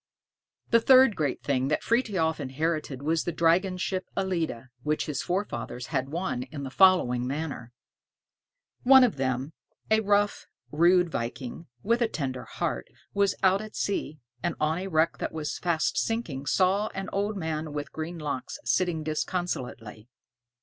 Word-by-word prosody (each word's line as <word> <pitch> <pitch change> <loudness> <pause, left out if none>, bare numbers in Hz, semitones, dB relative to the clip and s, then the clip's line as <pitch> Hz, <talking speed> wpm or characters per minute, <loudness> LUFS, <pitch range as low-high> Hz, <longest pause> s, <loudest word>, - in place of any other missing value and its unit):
The 230 - +7
third 260 -3 +7
great 145 -4 -2
thing 135 -2 +1
that 150 - 0
Frithiof 195 -10 +1
inherited 145 0 -2
was 160 +2 +1
the 175 - -2
dragon 175 +3 +2
ship 185 +1 -2
"Ellide," 165 -10 -2
which 150 +3 0
his 150 - -2
forefathers 125 - -3
had 130 -1 0
won 170 -4 -2
in 140 +3 -7
the 135 - -5
following 130 -10 +4
manner: 140 -4 -4 1.1
One 265 +1 +8
of 235 - +2
them, 130 +3 -1 0.4
a 220 - +6
rough, 205 -1 +1 0.2
rude 175 +2 +4
viking, 120 +6 -5 0.2
with 235 +2 +2
a 235 - +4
tender 130 - -4
heart, - - -3 0.3
was 200 -1 +2
out 190 +1 +4
at 215 0 -9
sea, 175 -6 -2 0.2
and 175 - -1
on 155 +3 +1
a 190 - -4
wreck 165 -2 +1
that - - -3
was 155 -2 -4
fast 170 -3 +1
sinking 160 - -2
saw 190 +6 +2
an 195 0 -4
old 205 +1 -1
man 160 -3 -3
with 145 0 -5
green 160 +2 -5
locks 145 -4 -4
sitting 175 -4 +1
disconsolately. 130 - -4
160 Hz, 155 wpm, -27 LUFS, 140-190 Hz, 1.1 s, One